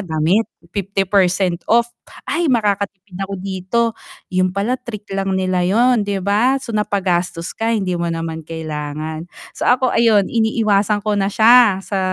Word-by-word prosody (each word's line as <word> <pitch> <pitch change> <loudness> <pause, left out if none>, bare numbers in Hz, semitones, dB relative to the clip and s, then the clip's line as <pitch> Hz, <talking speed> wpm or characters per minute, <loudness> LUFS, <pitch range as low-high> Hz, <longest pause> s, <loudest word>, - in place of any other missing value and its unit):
damit, 165 +4 +1 0.3
50% 190 -2 +1
off, 235 +1 +4 0.4
ay 340 0 0
makakatipid 200 -4 -1
ako 195 +1 -4
dito, 190 +3 -2 0.5
'yun 185 0 +2
pala 200 +6 -1
trick 215 -4 -9
lang 195 0 -1
nila, 185 -1 0
'yun, 235 +4 +3
'di 200 -1 -2
ba. 215 +8 +2
So, 235 -4 -7
napagastos 180 -5 -1
ka, 225 +1 -1
hindi 190 -5 -1
mo 170 0 -2
naman 165 -1 -4
kailangan, 155 0 -5 0.3
so, - - -4
ako 255 0 +2
ayun 220 -4 +4
iniiwasan 215 -2 +1
ko 210 0 -1
na 195 0 0
siya 225 -2 +6
sa 195 0 -3
195 Hz, 150 wpm, -18 LUFS, 180-220 Hz, 0.5 s, siya